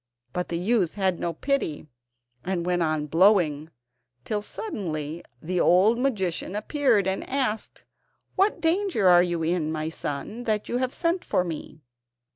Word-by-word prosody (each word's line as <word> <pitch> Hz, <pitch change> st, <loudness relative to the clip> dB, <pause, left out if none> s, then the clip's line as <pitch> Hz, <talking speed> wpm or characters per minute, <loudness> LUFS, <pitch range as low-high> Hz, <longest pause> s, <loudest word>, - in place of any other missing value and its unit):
But 180 Hz, 0 st, -3 dB
the 170 Hz, -, -1 dB
youth 190 Hz, -1 st, +1 dB
had 190 Hz, -4 st, 0 dB
no 170 Hz, -, -1 dB
pity, 215 Hz, -, -2 dB, 0.6 s
and 180 Hz, -2 st, -2 dB
went 175 Hz, 0 st, +1 dB
on 155 Hz, -2 st, 0 dB
blowing, 165 Hz, -2 st, +3 dB, 0.6 s
till 210 Hz, -1 st, -1 dB
suddenly 170 Hz, -, -5 dB, 0.2 s
the 180 Hz, +2 st, -1 dB
old 195 Hz, +8 st, +4 dB
magician 200 Hz, -8 st, -1 dB
appeared 235 Hz, -2 st, +2 dB
and 190 Hz, 0 st, -1 dB
asked: 255 Hz, -5 st, -2 dB, 0.5 s
"What 395 Hz, +3 st, +2 dB
danger 340 Hz, -, +2 dB
are 175 Hz, -1 st, +7 dB
you 175 Hz, -2 st, -1 dB
in, 160 Hz, -1 st, 0 dB
my 155 Hz, 0 st, -2 dB
son, 165 Hz, +10 st, -5 dB
that 215 Hz, -2 st, 0 dB
you 240 Hz, -, -1 dB
have 255 Hz, 0 st, -1 dB
sent 340 Hz, +4 st, 0 dB
for 180 Hz, -, +1 dB
me?" 160 Hz, -2 st, -7 dB
185 Hz, 150 wpm, -26 LUFS, 165-235 Hz, 0.6 s, are